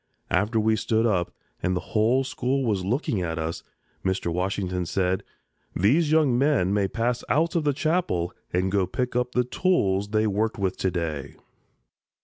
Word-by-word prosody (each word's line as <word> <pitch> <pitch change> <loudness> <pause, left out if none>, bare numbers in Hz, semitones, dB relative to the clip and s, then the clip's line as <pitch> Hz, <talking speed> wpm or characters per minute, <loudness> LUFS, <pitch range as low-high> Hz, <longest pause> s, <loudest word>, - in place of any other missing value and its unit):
After 110 +2 +2
we 110 0 +3
stood 110 +2 +1
up 90 -6 +1 0.3
and 90 0 0
the - - -8
whole 115 +5 +3
school 130 +1 -1
was 100 -5 0
looking 110 - -1
at 80 -2 -2
us, 80 +1 -3 0.4
Mr. 95 -3 -1
Washington 90 -1 -2
said: 95 0 0 0.5
"These 145 - +3
young 155 -6 +4
men 125 -8 +2
may 100 -1 +2
pass 120 +4 -1
out 165 +3 +2
of 165 -3 +1
the 145 - +4
Chapel 155 - 0 0.2
and 90 +1 0
go 100 - +2
and 95 - -1
pick 125 -1 -2
up 125 0 0
the 125 - +3
tools 105 - +1
they 110 +1 +2
worked 105 +1 0
with 95 -2 -1
to 95 - 0
day." 80 -6 -4
105 Hz, 175 wpm, -25 LUFS, 90-125 Hz, 0.5 s, young